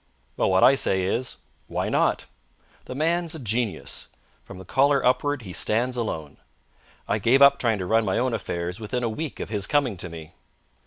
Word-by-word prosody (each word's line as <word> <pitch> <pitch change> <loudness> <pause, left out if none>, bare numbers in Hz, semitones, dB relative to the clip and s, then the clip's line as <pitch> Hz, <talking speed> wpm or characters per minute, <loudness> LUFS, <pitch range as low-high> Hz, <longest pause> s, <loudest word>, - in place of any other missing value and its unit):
Well, - - +1
what 95 0 +3
I - - +8
say 95 -8 +1
is: 115 +6 -2 0.3
Why - - -2
not? - - +1 0.6
The 130 - -7
man's 165 +3 0
a - - -6
genius. 115 -2 -2 0.3
From - - -11
the 95 - -10
collar 140 +6 +2
upward 130 +1 +1
he 95 -3 -8
stands 120 +7 0
alone. 80 - -4 0.7
I 105 - 0
gave 120 +6 +4
up 140 0 +6
trying 115 -3 +1
to 95 - -4
run 115 +4 +2
my 95 -3 0
own 125 -1 0
affairs 90 -3 -3
within 115 +3 -3
a 115 - 0
week 150 +6 -5
of - - -5
his 105 -3 -2
coming 135 -9 +1
to 90 - -5
me. 80 -2 -10
115 Hz, 195 wpm, -25 LUFS, 95-135 Hz, 0.7 s, I